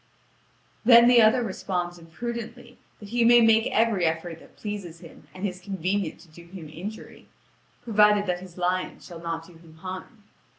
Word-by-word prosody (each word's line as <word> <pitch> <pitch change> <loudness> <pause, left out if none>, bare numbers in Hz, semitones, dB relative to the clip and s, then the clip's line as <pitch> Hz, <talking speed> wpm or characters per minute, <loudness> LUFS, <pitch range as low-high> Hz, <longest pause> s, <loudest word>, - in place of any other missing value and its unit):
Then 235 0 +8
the 245 -1 +7
other 220 +3 +4
responds 180 -4 -4
imprudently 235 +7 -7 0.2
that 205 - -11
he 240 +1 +1
may 240 +1 +7
make 225 -1 +4
every 220 -4 +1
effort 165 0 -2
that - - -19
pleases 195 -6 -7
him - - -15
and 185 +2 -6
is 180 -1 -8
convenient 190 -2 -2
to - - -17
do 170 +2 -15
him 170 -4 -10
injury, 190 +8 -9 0.6
provided 210 -2 +4
that 180 -2 -1
his 185 -1 -13
lion 180 +1 -1
shall 170 -2 -11
not 165 -1 -4
do 175 - -16
him 165 -1 -18
harm. 185 +5 -9
190 Hz, 170 wpm, -25 LUFS, 175-220 Hz, 0.6 s, Then